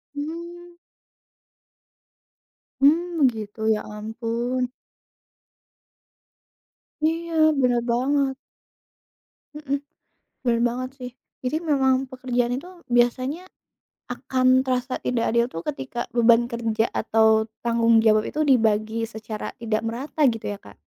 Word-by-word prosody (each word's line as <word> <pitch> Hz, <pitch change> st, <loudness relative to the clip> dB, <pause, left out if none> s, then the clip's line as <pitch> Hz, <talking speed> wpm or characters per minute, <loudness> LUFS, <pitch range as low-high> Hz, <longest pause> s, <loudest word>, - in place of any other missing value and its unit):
Mmm. 340 Hz, +3 st, -7 dB, 2.1 s
Mmm, 325 Hz, +5 st, +5 dB
begitu, 220 Hz, -4 st, 0 dB, 0.2 s
ya -, -, -4 dB, 0.2 s
ampun. 235 Hz, +3 st, -2 dB, 2.3 s
Iya 330 Hz, +1 st, -1 dB, 0.3 s
benar 245 Hz, -1 st, +2 dB
banget. 265 Hz, +3 st, +1 dB, 1.2 s
Mhm. 285 Hz, -2 st, -2 dB, 0.7 s
Benar 235 Hz, -1 st, +2 dB
banget 250 Hz, +2 st, -1 dB
sih. 250 Hz, -1 st, -6 dB, 0.3 s
Jadi 255 Hz, +5 st, 0 dB
memang 270 Hz, -4 st, +2 dB
pekerjaan 245 Hz, -2 st, -1 dB
itu 350 Hz, +8 st, -7 dB, 0.2 s
biasanya 255 Hz, +7 st, +1 dB, 0.6 s
akan 255 Hz, +1 st, +2 dB
terasa 255 Hz, 0 st, -2 dB
tidak 235 Hz, -2 st, 0 dB
adil 235 Hz, +1 st, +2 dB
itu -, -, -6 dB
ketika 255 Hz, -3 st, -5 dB
beban 235 Hz, 0 st, +5 dB
kerja 225 Hz, -1 st, -1 dB
atau 220 Hz, 0 st, +3 dB, 0.2 s
tanggung 230 Hz, -1 st, +4 dB
jawab 215 Hz, -1 st, +4 dB
itu 305 Hz, 0 st, -1 dB
dibagi 225 Hz, -3 st, +2 dB
secara 220 Hz, -1 st, -6 dB
tidak 225 Hz, -2 st, -1 dB
merata 255 Hz, +7 st, -3 dB
gitu 225 Hz, -1 st, -6 dB
ya, 205 Hz, 0 st, -4 dB
Kak. -, -, -15 dB
245 Hz, 105 wpm, -24 LUFS, 230-270 Hz, 2.3 s, Mmm